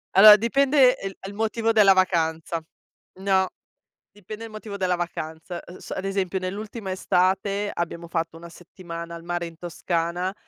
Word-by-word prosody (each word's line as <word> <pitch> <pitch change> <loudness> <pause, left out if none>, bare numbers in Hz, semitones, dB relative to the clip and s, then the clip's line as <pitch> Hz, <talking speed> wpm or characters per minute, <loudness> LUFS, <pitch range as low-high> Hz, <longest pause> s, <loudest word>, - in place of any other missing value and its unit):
Allora 210 +2 +11
dipende 260 +3 +4
e 195 - -4
il 195 - -9
e - - -8
il - - -9
motivo 225 +2 0
della 205 -3 +6
vacanza. 165 -3 0 0.6
No, 190 -1 +2 0.6
dipende 210 +2 -9
il - - -9
motivo 215 -1 -8
della 185 -2 +1
vacanza. 170 0 -5
E 180 - -12
s - - -11
ad 190 - -3
esempio 195 -1 -1
nell'ultima 200 +2 -5
estate 190 +2 +1
abbiamo 170 0 -4
fatto 165 -1 -2
1 170 +1 -11
settimana 170 0 -9
al 165 - -10
mare 175 0 -3
in 165 -1 -10
Toscana, 175 +1 -2
185 Hz, 165 wpm, -24 LUFS, 170-205 Hz, 0.6 s, Allora